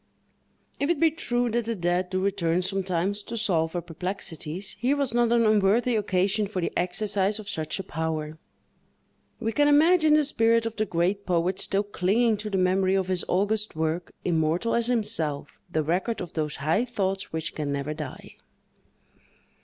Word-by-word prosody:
If 285 - 0
it 345 -4 +1
be 325 0 +4
true 245 -7 0
that 235 0 0
the 230 0 -2
dead 175 0 0
do 185 0 -1
return 180 -3 +1
sometimes 190 +1 -1
to 230 +3 -5
solve 170 -7 +1
our 175 - -2
perplexities, 175 0 -5
here 260 +4 +2
was 275 -5 0
not 240 -1 +2
an 235 -1 +4
unworthy 215 +3 +3
occasion 200 0 +1
for 195 -2 -4
the 170 - -2
exercise 195 +3 0
of 215 -2 -9
such 155 -4 -3
a 195 - -4
power. 155 0 -4 1.0
We 225 -1 -1
can 290 +5 +3
imagine 310 +1 +5
the 305 -1 +3
spirit 230 -4 +2
of 225 -1 -3
the 215 0 -1
great 185 +4 0
poet 180 +1 +1
still 200 0 +1
clinging 210 +3 +1
to 210 +1 -5
the 195 - -1
memory 185 +1 +2
of 190 -1 0
his 185 -2 +2
august 210 +2 0
work, 160 +2 -2
immortal 170 +6 +1
as 235 0 +3
himself—the 170 -8 -2
record 185 +9 -1
of 180 - -6
those 155 -2 -2
high 155 +10 +1
thoughts 195 -6 -2
which 160 0 -3
can 150 -2 -3
never 140 +2 -2
die. 150 -4 -8
195 Hz, 175 wpm, -26 LUFS, 170-225 Hz, 1.0 s, imagine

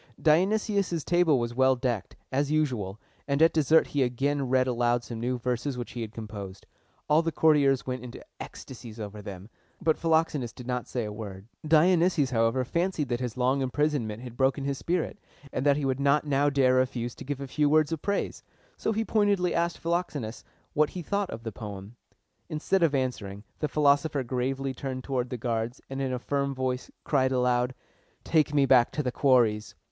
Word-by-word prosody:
Dionysius' 190 +1 +2
table 175 -4 +3
was 120 -1 -2
well 130 +1 +4
decked, 120 -4 -2 0.2
as 140 +2 +1
usual, 125 -11 -1 0.3
and 140 0 +1
at 165 +1 +5
dessert 160 +1 +4
he 145 - -1
again 135 +2 0
read 130 0 +3
aloud 120 -1 +1
some 115 -2 -6
new 125 +2 -1
verses 125 +2 -2
which 120 - -5
he 120 - -5
had 110 -2 -5
composed. 105 -4 -8 0.4
All 150 +2 +5
the 165 0 -1
courtiers 145 -4 +3
went 125 -1 -4
into 125 - -9
ecstasies 120 -3 -9
over 105 0 -6
them, 100 -1 -8 0.3
but 160 - +1
Philoxenus 160 -7 +1
did 125 - -10
not 125 0 -2
say 120 -3 -2
a 105 - -5
word. 100 -3 -8 0.2
Dionysius, 165 -2 +4
however, 115 +2 +2
fancied 170 -2 -1
that 120 -1 -1
his 125 -2 -4
long 130 +2 +2
imprisonment 130 -5 -1
had 120 -2 -8
broken 135 +2 +1
his 140 -1 -2
spirit, 175 -1 -2 0.3
and 130 - -1
that 140 0 +4
he 145 - -1
would 130 0 0
not 140 +2 +3
now 145 0 +2
dare 135 -2 +3
refuse 125 -2 0
to - - -10
give 140 0 -4
a 140 - -4
few 145 +2 +1
words 155 0 +3
of 160 -3 -2
praise: 200 0 -2 0.4
so - - -1
he 225 +1 -1
pointedly 205 -5 +2
asked 170 0 0
Philoxenus 165 -9 -3 0.3
what 155 -2 +3
he 180 - -6
thought 200 +2 -1
of 115 - -7
the 115 - -4
poem. 105 0 -8 0.5
Instead 160 +5 0
of 160 -4 +3
answering, 105 -7 -3 0.2
the 150 - 0
philosopher 145 -1 +2
gravely 130 +2 -2
turned 130 0 -5
toward 125 -3 -2
the 125 - -4
guards, 115 +1 -2
and 135 0 -3
in 135 -1 -1
a 125 - -1
firm 140 +2 -1
voice 130 -1 -2
cried 130 -3 +2
aloud, 125 0 +1 0.5
"Take 155 -2 +2
me 145 -2 +4
back 125 -3 +5
to 150 - -1
The 125 - -1
Quarries!" 120 -6 +2
130 Hz, 195 wpm, -28 LUFS, 120-150 Hz, 0.5 s, at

